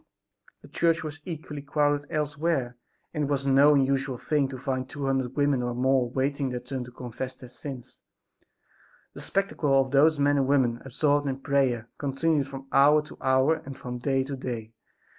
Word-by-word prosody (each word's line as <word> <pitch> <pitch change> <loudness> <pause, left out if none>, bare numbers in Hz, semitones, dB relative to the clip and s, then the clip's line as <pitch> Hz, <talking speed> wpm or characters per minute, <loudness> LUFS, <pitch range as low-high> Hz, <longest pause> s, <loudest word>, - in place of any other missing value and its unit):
The - - -12
church 165 -1 +1
was 155 0 -7
equally 155 -4 -6
crowded 145 0 0
elsewhere, 150 -4 -1 0.4
and 150 -3 0
it - - -3
was 140 -1 -1
no 140 +2 +6
unusual 135 -1 +1
thing 145 +2 0
to 130 - -6
find 130 0 -3
two 145 -1 -5
hundred 130 -1 -1
women 145 -3 +2
or 120 0 -2
more 130 0 +2
waiting 135 +2 -1
their 125 -1 -3
turn 125 +1 -5
to 125 - -12
confess 125 +1 -6
their 125 - -12
sins. 130 -1 -9 1.1
The - - -8
spectacle 155 -8 +1
of 130 -1 0
those 150 +3 +5
men 145 0 +3
and 135 -1 +2
women 125 -4 +2
absorbed 145 +2 +1
in 135 -1 -1
prayer 135 -5 0
continued 145 +1 0
from 135 -1 -8
hour 150 +2 +5
to 150 - -13
hour 130 +4 +3
and 135 -1 -8
from 125 0 -6
day 135 +1 +1
to 135 +1 -5
day. 115 -4 -5
135 Hz, 180 wpm, -27 LUFS, 130-145 Hz, 1.1 s, no